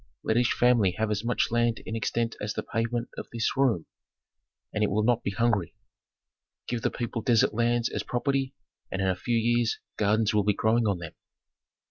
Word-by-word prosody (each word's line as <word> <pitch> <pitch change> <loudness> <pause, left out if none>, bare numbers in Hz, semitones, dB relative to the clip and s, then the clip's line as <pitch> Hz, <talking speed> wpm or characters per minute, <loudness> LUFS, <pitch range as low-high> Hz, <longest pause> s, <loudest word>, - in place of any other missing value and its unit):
Let 110 - +1
each 120 0 +3
family 120 -7 +3
have 110 +2 -1
as 105 +1 -1
much 120 0 0
land 120 -1 +2
in 110 - -4
extent 115 +1 -1
as 105 +1 -3
the - - -2
pavement 115 +1 -2
of - - -7
this 115 -2 -1
room, 130 -11 +2 0.9
and 105 - 0
it 105 - +2
will 105 +2 +1
not 120 +1 +2
be - - -2
hungry. 100 -3 0 0.9
Give 120 -1 -2
the - - +1
people 120 -1 -4
desert 120 +3 +3
sands 120 0 +2
as - - -3
property, 135 +1 -1 0.4
and 95 - -3
in 95 - +1
a 95 - +2
few 115 +6 -1
years 120 0 +1 0.2
gardens 105 +1 +2
will 105 -1 +3
be 105 0 +2
growing 110 +1 +2
on 100 -3 +1
them." 85 -2 -8
115 Hz, 195 wpm, -27 LUFS, 105-120 Hz, 0.9 s, each